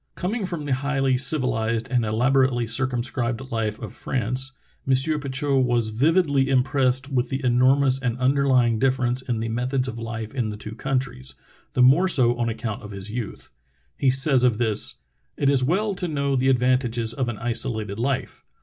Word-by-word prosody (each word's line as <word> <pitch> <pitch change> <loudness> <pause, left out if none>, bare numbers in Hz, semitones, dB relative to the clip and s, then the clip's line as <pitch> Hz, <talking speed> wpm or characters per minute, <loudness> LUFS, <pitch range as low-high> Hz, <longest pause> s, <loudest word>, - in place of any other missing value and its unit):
Coming 195 +2 -3
from 170 -5 -5
the 140 - 0
highly 135 0 0
civilized 115 -5 +1
and 125 -2 +2
elaborately 125 +2 +1
circumscribed 125 +1 -2
life 110 -2 -2
of - - -8
France, 130 +2 -3 0.4
M. 135 - +4 0.2
Petitot 140 0 0
was 120 -3 +1
vividly 140 +3 +2
im 130 -2 +3
pressed 130 0 0
with 125 -3 -1
the 135 0 -3
enormous 130 +2 +3
and 125 -2 -2
underlying 130 -3 +2
difference 130 -1 0
in 120 -3 -3
the 115 - -2
methods 125 +3 -1
of 115 -2 -6
life 115 -1 -6
in 120 -5 -2
the 105 - -6
two 105 +1 -8
countries, 130 +1 -3 0.4
the 125 - +3
more 145 +9 +5
so 125 -8 +3
on 120 -1 0
account 110 -1 -5
of 105 - -10
his 100 +1 -8
youth. 115 -3 -6 0.4
He 135 - +1
says 135 0 +3
of 120 -4 +3
this: 110 -3 +2 0.4
"It 140 -1 +2
is 135 -2 +2
well 200 +9 0
to 180 -1 -3
know 140 -3 -1
the 130 +1 +2
advantages 125 -3 +1
of 125 0 -2
an 115 - -5
isolated 110 -3 -1
life. 130 +2 -3
130 Hz, 175 wpm, -23 LUFS, 115-135 Hz, 0.4 s, more